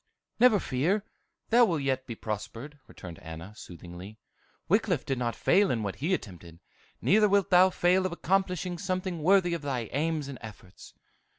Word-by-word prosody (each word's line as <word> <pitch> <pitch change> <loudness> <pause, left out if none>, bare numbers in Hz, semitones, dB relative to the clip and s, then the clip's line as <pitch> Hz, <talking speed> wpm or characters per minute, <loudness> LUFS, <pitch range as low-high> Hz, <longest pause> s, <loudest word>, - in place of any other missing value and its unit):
"Never 235 -4 +6
fear, 180 +10 0 0.4
thou 240 +1 +6
wilt 165 -8 -1
yet 130 -1 -1
be 115 - -5
prospered," 115 +7 -6
returned 85 -4 -11
Anna, 80 +5 -9
soothingly. 90 0 -11 0.5
"Wickliffe 190 - +1
did 135 -2 -2
not 120 -3 -2
fail 195 +1 +3
in 115 -3 -1
what 100 -2 -4
he 155 +8 -2
attempted, 85 - -10 0.4
neither 210 +2 +4
wilt 200 -1 +2
thou 185 +1 +7
fail 185 +1 +2
of - - -8
accomplishing 180 0 -1
something 185 -3 -3
worthy 180 +1 +3
of 170 - -3
thy 130 -6 -3
aims 155 0 -1
and 135 -3 -8
efforts." 100 -4 -13
150 Hz, 165 wpm, -28 LUFS, 110-185 Hz, 0.5 s, thou